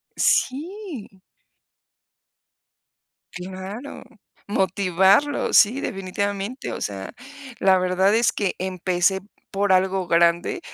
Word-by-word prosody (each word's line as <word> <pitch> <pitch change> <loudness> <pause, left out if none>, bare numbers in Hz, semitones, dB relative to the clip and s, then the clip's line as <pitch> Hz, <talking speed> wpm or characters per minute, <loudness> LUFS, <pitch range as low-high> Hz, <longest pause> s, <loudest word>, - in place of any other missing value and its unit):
sí. 295 - -2 2.1
Claro, 190 +8 -8 0.4
motivarlo, 195 +7 +2
sí, 225 +6 +5
definitivamente, 200 +3 -4
o - - -6
sea 100 -2 -5 0.5
la 190 -1 +4
verdad 185 +2 +2
es 225 0 +2
que 200 -3 -2
empecé 185 +1 0 0.3
por 200 0 0
algo 190 0 +2
grande 170 - +2
195 Hz, 85 wpm, -23 LUFS, 185-210 Hz, 2.1 s, sí